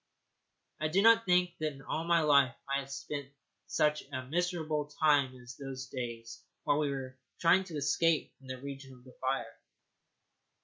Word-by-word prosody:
I 155 - +1
do 170 +5 +2
not 230 -1 +6
think 180 -1 +2
that 155 -1 -1
in 135 -1 -13
all 160 - -2
my 170 -1 +4
life 140 -5 +4
I 140 0 +1
have 135 0 -8
spent 140 0 -5 0.4
such 150 0 +2
a 130 - -4
miserable 160 -1 -1
time 145 -3 +2
as 125 +1 -10
during 135 +1 -8
those 130 0 -6
days 115 -3 -6 0.2
while 145 - +2
we 150 -2 +1
were 130 -2 -5 0.2
trying 185 +3 +4
to 170 -4 -8
escape 150 +3 +1
from 135 - -16
the 130 0 -5
region 135 0 -8
of 125 - -19
the 130 -1 -15
fire. 135 +1 -2
140 Hz, 180 wpm, -32 LUFS, 130-160 Hz, 0.4 s, not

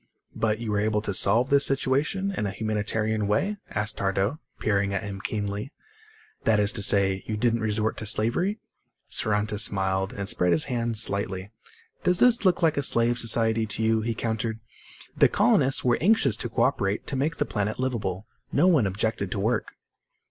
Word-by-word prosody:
"But 110 -1 0
you 115 -1 -5
were 105 - 0
able 105 0 0
to 100 - -2
solve 115 +8 +3
this 140 0 +5
situation 145 +9 0
in 105 - -2
a - - -3
humanitarian 110 0 -2
way?" 195 - 0
asked 105 +1 -3
Tardo, 100 +7 -1 0.2
peering 100 -2 0
at 95 - -2
him 100 -1 -7
keenly. 105 +4 -4 0.7
"That 110 -2 +2
is 105 0 +2
to 115 -3 -4
say, 95 -1 +2
you 110 - -3
didn't 115 +1 +1
resort 110 0 -1
to 110 - -5
slavery?" 120 - 0 0.5
Saranta 105 0 -1
smiled 95 -2 +2
and 100 -1 -5
spread 90 -5 +2
his 80 - +2
hands 115 -2 +2
slightly. 100 -1 -2 0.5
"Does 180 0 +3
this 240 +1 +4
look 180 -2 +2
like 160 -2 +2
a - - +2
slave 120 -2 +2
society 115 0 +2
to 110 +1 -3
you?" 110 0 +2
he 115 +1 -3
countered. 110 0 -3 0.6
"The - - +5
colonists 135 +1 +2
were 120 -1 +2
anxious 180 - +3
to - - -3
co - - 0
operate 95 +2 -1
to - - -2
make 145 +5 -1
the - - 0
planet 105 0 -3
liveable. 110 -7 -3 0.3
No - - +2
one 155 - +3
objected 100 0 -2
to 100 - -3
work." 110 +3 -1
110 Hz, 185 wpm, -25 LUFS, 100-120 Hz, 0.7 s, this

